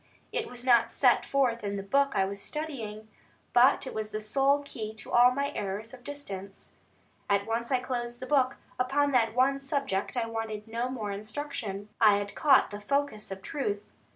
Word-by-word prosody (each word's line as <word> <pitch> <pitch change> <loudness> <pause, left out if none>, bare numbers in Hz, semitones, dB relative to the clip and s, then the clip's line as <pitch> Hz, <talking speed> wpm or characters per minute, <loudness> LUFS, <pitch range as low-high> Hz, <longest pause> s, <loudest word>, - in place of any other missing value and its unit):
It - - -2
was 245 0 -7
not 240 -3 +4
set - - +4
forth 250 -5 +1
in 200 0 -2
the 195 - -4
book 275 +7 +2
I 195 -1 +3
was 200 +1 -5
studying; 225 -7 -5 0.5
but 255 +4 +5
it - - -6
was 215 -1 -3
the 215 - -3
sole 275 +6 +2
key 220 -6 -6
to 220 - -9
all 245 +1 +7
my 280 +2 -1
errors 205 +4 -4
of 250 -1 -12
distance. 200 -9 -8 0.6
At 200 0 +2
once 230 +2 -2
I 260 - +4
closed 240 -1 -4
the 255 - -5
book; 260 -2 +2 0.2
upon 285 +3 +2
that 230 -3 +2
one 270 +2 +3
subject 275 -7 -2
I 235 - +1
wanted 225 -1 -4
no 235 +3 -2
more 220 -5 -4
instruction, 210 -1 -5
I 210 -2 +7
had 205 0 -3
caught 275 -7 +4
the 205 0 -7
focus 280 -1 -1
of 190 0 -7
truth. 205 -7 -2
235 Hz, 190 wpm, -29 LUFS, 210-270 Hz, 0.6 s, all